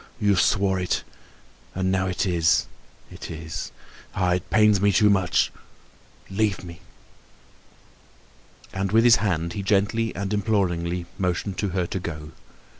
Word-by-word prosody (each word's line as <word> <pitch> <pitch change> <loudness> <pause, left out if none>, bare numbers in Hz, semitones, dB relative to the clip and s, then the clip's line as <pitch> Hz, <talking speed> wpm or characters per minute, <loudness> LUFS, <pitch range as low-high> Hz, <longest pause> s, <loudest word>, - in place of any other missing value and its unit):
You 100 -2 +3
swore 95 +1 +2
it. 90 - -1 0.7
And 95 0 0
now 95 0 +1
it 90 +1 -1
is—it 85 -3 -2
is! 80 0 -6 0.4
Ah, 90 -2 +1
it 90 -1 -3
pains 105 -2 +4
me 100 0 +4
too 105 +1 +4
much, 95 -3 +2 0.8
leave 100 -1 -1
me!" 85 -1 -10 1.9
And 95 0 -2
with 115 +1 +5
his 120 -1 +7
hand 85 -5 -1
he 100 - -4
gently 105 +3 +1
and 100 +1 -3
imploringly 90 -5 0
motioned 90 +1 -2
to 100 - 0
her 90 - +1
to 95 - -4
go. 75 -3 -7
95 Hz, 135 wpm, -24 LUFS, 90-100 Hz, 1.9 s, his